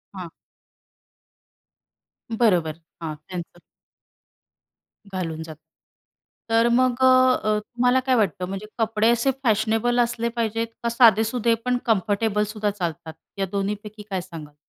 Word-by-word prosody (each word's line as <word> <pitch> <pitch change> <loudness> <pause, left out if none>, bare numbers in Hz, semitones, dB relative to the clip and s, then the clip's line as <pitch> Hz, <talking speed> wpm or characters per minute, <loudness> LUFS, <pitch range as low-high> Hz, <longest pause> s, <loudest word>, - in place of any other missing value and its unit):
हां. 180 -3 -7 2.1
बरोबर. 175 -9 +2 0.2
हां, 160 -2 -4
कॅन्सल. 175 -1 -7 1.5
घालून 165 -4 -3
जातो. 155 -1 -11 0.9
तर 230 +1 +4
मग, 255 0 +3
अ, 260 - +6 0.4
अ, 215 0 +1
तुम्हाला 245 +4 +1
काय 260 -1 +3
वाटतं 185 -6 0
म्हणजे 195 +2 -6
कपडे 225 0 +2
असे 235 +3 +2
फॅशनेबल 225 +1 +1
असले 235 -1 0
पाहिजेत 230 0 -1 0.2
का 235 - +1
साधेसुधे 230 0 +4
पण 250 0 +1
कम्फर्टेबलसुद्धा 210 -1 0
चालतात. 170 -5 -5 0.2
या 195 - 0
दोन्हीपैकी 210 +1 -4
काय 190 -2 -2
सांगाल? 165 -5 -10
215 Hz, 115 wpm, -23 LUFS, 185-235 Hz, 2.1 s, अ